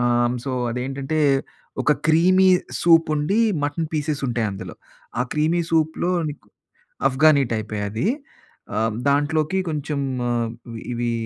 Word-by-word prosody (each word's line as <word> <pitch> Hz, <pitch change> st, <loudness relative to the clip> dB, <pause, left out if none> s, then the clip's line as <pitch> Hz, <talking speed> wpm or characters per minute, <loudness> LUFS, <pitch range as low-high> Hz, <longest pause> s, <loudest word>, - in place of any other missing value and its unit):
ఆహ్, 120 Hz, 0 st, +2 dB
హ్మ్. 120 Hz, +1 st, -1 dB
సో, 135 Hz, -, -3 dB, 0.2 s
అదేంటంటే 135 Hz, +5 st, -3 dB, 0.6 s
ఒక -, -, +2 dB, 0.2 s
క్రీమీ 185 Hz, +4 st, +5 dB, 0.3 s
సూప్ 165 Hz, -1 st, +5 dB
ఉండి. 155 Hz, +10 st, +1 dB, 0.2 s
మటన్ 155 Hz, +2 st, -2 dB
పీసెస్ 150 Hz, -1 st, -2 dB
ఉంటాయి 115 Hz, -2 st, 0 dB
అందులో. 95 Hz, -3 st, -7 dB, 0.5 s
ఆ -, -, +4 dB
క్రీమీ 160 Hz, +3 st, +2 dB
సూప్‌లో 160 Hz, +2 st, +1 dB, 0.2 s
నీకు 140 Hz, -8 st, -9 dB, 0.6 s
అఫ్గాని 140 Hz, +2 st, +4 dB
టైపే 110 Hz, -1 st, -3 dB
అది. 110 Hz, -, -2 dB, 0.7 s
ఆహ్, 110 Hz, 0 st, +1 dB, 0.2 s
దాంట్లోకి 150 Hz, +5 st, +1 dB
కొంచెం 150 Hz, -1 st, -3 dB, 0.3 s
ఆహ్, 120 Hz, -1 st, 0 dB, 0.4 s
ఇవి 120 Hz, 0 st, -1 dB
145 Hz, 130 wpm, -22 LUFS, 120-160 Hz, 0.7 s, క్రీమీ